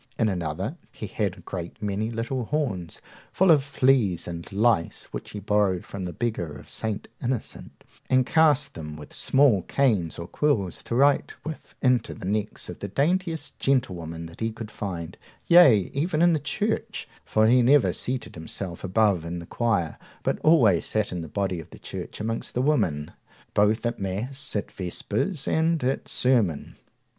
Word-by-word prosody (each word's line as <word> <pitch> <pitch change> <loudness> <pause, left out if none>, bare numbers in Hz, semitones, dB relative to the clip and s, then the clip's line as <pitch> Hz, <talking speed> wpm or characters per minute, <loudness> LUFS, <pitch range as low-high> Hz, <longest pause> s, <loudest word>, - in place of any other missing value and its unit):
In 110 -2 +2
another, 85 -5 -3
he - - -7
had - - -2
a - - -13
great 85 -2 -6
many 105 +1 -2
little 120 +2 -2
horns 110 - -2 0.3
full 190 -1 +4
of 145 -4 +5
fleas 130 -10 +2
and 85 -1 -7
lice, 105 -4 +2
which - - -6
he 105 - -6
borrowed 100 -3 +1
from 95 -2 -6
the 90 - -4
beggars 85 -10 -3
of 85 - -15
St. 110 -2 -3
Innocent, 125 -2 -4 0.3
and 130 0 +4
cast 150 -2 +3
them 75 -1 -7
with 75 -1 -11
small 130 -8 +4
canes 105 - +1
or 85 - -5
quills 105 - 0
to 115 - -2
write 140 +2 +3
with 155 -1 -7
into 125 -3 +2
the 110 - -9
necks 105 +2 -2
of 90 - -8
the 100 - -4
daintiest 165 - -1
gentlewomen 85 -12 -1
that 85 0 -12
he 115 0 -1
could 110 -1 -8
find, 85 -7 -5 0.3
yea, 135 - +6
even 155 +3 +1
in 175 -1 +5
the 155 - +1
church, 215 +8 -2 0.2
for 110 0 +2
he 125 +3 +5
never 135 +3 +5
seated 130 +2 -3
himself 85 +2 -6
above 100 -2 +2
in 85 +1 -4
the 85 - -7
choir, 105 -6 -1 0.2
but - - 0
always 120 - +5
sat 110 -1 -1
in 90 -1 -3
the 80 - -7
body 95 -2 -1
of 80 - -10
the - - -12
church - - -7
amongst 115 +2 -3
the 125 - +2
women, 80 - +1 0.4
both 105 +3 +3
at 120 - -1
mass, 120 +10 -3
at 105 - -2
vespers, 110 - -2
and 160 -2 +2
at 130 +2 -1
sermon. 115 - +1
110 Hz, 175 wpm, -26 LUFS, 90-135 Hz, 0.4 s, yea